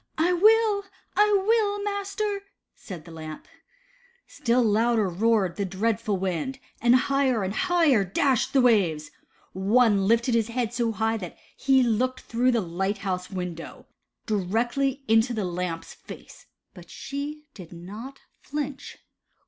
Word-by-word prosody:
*' - - -45
I 345 +3 +2
will, 425 +2 +4 0.3
I 420 0 +4
will, 420 -2 +2
master," 405 0 -2 0.3
said 180 -6 -10
the 170 - -12
Lamp. 155 -1 -9 0.8
Still 240 +1 +1
louder 225 0 +2
roared 195 0 +1
the 200 - -1
dreadful 210 +2 -1
wind, 190 +8 -3 0.2
and 240 +1 +5
higher 260 -4 +2
and 190 +1 -2
higher 330 - +3
dashed 245 +7 +1
the 270 - +4
waves. 185 -11 +2 0.4
One 200 +1 +3
lifted 235 +3 +2
his 225 -2 +2
head 235 -1 -2
so 235 -1 0
high 225 +1 0
that 180 -5 -8 0.2
he 265 -1 +3
looked 250 +2 0
through 245 +2 0
the 235 -3 +2
light 190 +3 -2
house 180 -1 -2
window, 180 -3 -6 0.4
directly 240 +7 -1
into 225 +2 +3
the 210 -3 -1
Lamp's 175 -2 -4
face, - - -13 0.3
but - - -14
she 295 +2 -6
did 180 -5 -12
not 210 +10 -9 0.2
flinch. 285 -1 -5
230 Hz, 140 wpm, -25 LUFS, 195-275 Hz, 0.8 s, and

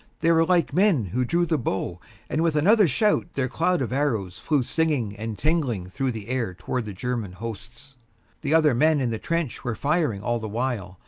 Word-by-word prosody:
They 165 - +4
were 165 0 +5
like 180 -2 +2
men 185 - +3
who 120 +8 -1
drew 170 +7 +1
the 160 -3 0
bow, 95 -6 -3 0.3
and 155 - -1
with 165 -2 +1
another 200 +6 +5
shout, 205 - +2
their 135 -2 0
cloud 165 +4 +1
of 120 -1 -4
arrows 110 -10 -1
flew 145 -4 +1
singing 140 -8 0
and 110 0 -5
tingling 135 - 0
through 135 +8 -2
the 110 -2 -7
air 120 -8 -2
towards 120 +4 -3
the 105 - -5
German 115 -2 -3
hosts. 115 +6 -9 0.4
The 150 +1 +1
other 155 -4 +5
men 155 +5 +3
in 125 -3 0
the 110 - -3
trench 165 -6 -2
were 120 -2 -2
firing 145 - 0
all 120 +1 0
the 110 -1 -5
while. 110 -5 -3
130 Hz, 205 wpm, -25 LUFS, 110-160 Hz, 0.4 s, were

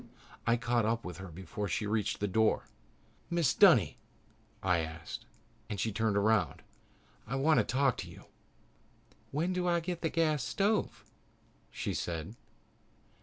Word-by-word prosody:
I 115 +1 +4
caught 120 0 +1
up 115 +2 0
with 90 -2 -6
her 95 0 -7
before 95 +4 -5
she 95 +4 -1
reached 105 0 0
the 105 - +1
door. 110 +3 +2 0.7
"Mrs. 170 -8 +1
Dunny," - - +6 0.6
I 90 -3 +3 0.2
said, - - -7 0.4
and 100 - -4
she 110 - 0
turned 110 0 +1
around. 105 -6 +2 0.6
"I 130 - -2
want 150 +4 +4
to - - +4
talk 135 -1 +1
to - - -6
you." - - -13 1.0
"When 165 +6 0
do 180 0 -1
I 170 -1 +3
get 175 0 -4
the 160 - +1
gas 155 -5 +1
stove?" 205 - 0 0.6
she - - -3
said. 85 +4 -4
115 Hz, 150 wpm, -32 LUFS, 100-155 Hz, 1.0 s, Dunny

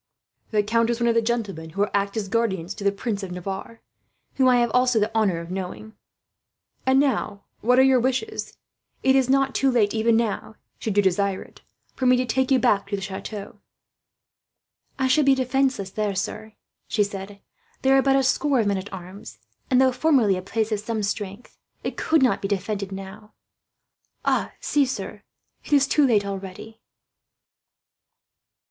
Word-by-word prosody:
The 210 -1 +1
count 230 +2 +1
is 235 0 -1
one 235 0 +2
of - - +3
the 230 - +3
gentlemen 210 -8 -3
who 200 +5 0
act 200 +1 0
as 210 -3 -2
guardians 195 -5 -1
to 205 - -9
the 200 - +3
Prince 200 +1 -3
of 190 -2 -6
Navarre, 195 +5 -6 0.5
whom 260 -1 +3
I 250 - +5
have 240 -1 +2
also 250 -2 +3
the 215 +2 -1
honour 205 -6 +2
of 170 +1 -8
knowing. 190 +3 -6 0.9
"And 265 +1 +5
now, 250 -7 0 0.2
what 250 +3 +3
are 260 - +7
your 265 -1 +5
wishes? 265 - -2 0.5
It 265 0 +4
is 265 -1 +3
not 270 0 +2
too 270 - +2
late 225 -5 +2
even 225 0 +3
now, 220 -1 -2 0.2
should 210 -2 -3
you 205 - +5
desire 190 +1 +1
it, - - -19 0.3
for 260 - 0
me 250 0 +5
to 255 - 0
take 260 +2 0
you 265 - +5
back 200 -4 +2
to 200 - -2
the 195 - -5
chateau." 195 +1 -7 1.4
"I 265 - +1
should 295 +4 +4
be 275 - +6
defenceless 260 -6 0
there, 210 -1 -2
sir," 215 +3 -4 0.3
she 210 - +2
said. 200 0 -7 0.4
"There 265 0 +5
are 270 - +5
but 270 0 +3
a 270 - +3
score 275 +1 +2
of 220 - +2
men 200 -1 +1
at 190 - -9
arms 185 +2 -10 0.3
and, 255 -2 +4
though 260 0 +5
formerly 255 -7 +3
a 185 - -4
place 220 +3 -2
of 210 - 0
some 220 0 -3
strength, 200 +2 -5 0.3
it - - -3
could 320 -3 +2
not 255 - +2
be 195 - -2
defended 200 0 -3
now. 195 +2 -9 1.3
See, 285 -2 +2
sir, 260 - -5 0.4
it - - -4
is 280 -1 +5
too 285 +1 +3
late 210 -4 +2
already." 195 +3 -7
220 Hz, 185 wpm, -24 LUFS, 200-255 Hz, 1.4 s, are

